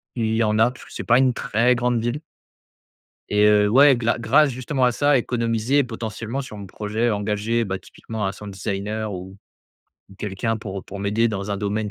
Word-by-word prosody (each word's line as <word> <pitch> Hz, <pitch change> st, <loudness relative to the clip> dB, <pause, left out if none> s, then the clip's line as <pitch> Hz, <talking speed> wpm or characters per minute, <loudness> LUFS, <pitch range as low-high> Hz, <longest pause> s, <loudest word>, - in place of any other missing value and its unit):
il 110 Hz, -2 st, 0 dB
y 115 Hz, -, +2 dB
en 105 Hz, 0 st, +1 dB
a 120 Hz, +2 st, +4 dB
parce 130 Hz, -, -14 dB
que -, -, -14 dB
c'est -, -, -5 dB
pas 120 Hz, +1 st, +5 dB
une 130 Hz, -2 st, +3 dB
très 120 Hz, +3 st, +2 dB
grande 120 Hz, -1 st, 0 dB
ville. 120 Hz, +6 st, -2 dB, 1.1 s
Et 105 Hz, 0 st, +3 dB
heu, 105 Hz, -1 st, +5 dB
ouais 135 Hz, +3 st, +6 dB
gla 120 Hz, 0 st, 0 dB
grâce 140 Hz, +6 st, +4 dB
justement 130 Hz, +1 st, -2 dB
à 125 Hz, -, +4 dB
ça 145 Hz, +2 st, +3 dB
économiser 120 Hz, +3 st, +1 dB
potentiellement 115 Hz, +2 st, -5 dB
sur 110 Hz, -5 st, -9 dB
mon 100 Hz, -, -8 dB
projet 110 Hz, +4 st, -2 dB
engager, 105 Hz, +2 st, 0 dB
bah, 95 Hz, -3 st, -3 dB
typiquement 110 Hz, +3 st, -6 dB
un 95 Hz, -, 0 dB
sound 105 Hz, 0 st, -9 dB
designer 100 Hz, +2 st, -3 dB
ou, 95 Hz, +2 st, -8 dB, 0.7 s
ou 95 Hz, -, -15 dB
quelqu'un 105 Hz, +3 st, -2 dB
pour 100 Hz, -3 st, -6 dB
pour 100 Hz, -, -8 dB
m'aider 105 Hz, +4 st, +1 dB
dans 100 Hz, -1 st, -4 dB
un 100 Hz, -, -1 dB
domaine 105 Hz, +1 st, -2 dB
110 Hz, 200 wpm, -22 LUFS, 105-120 Hz, 1.1 s, ouais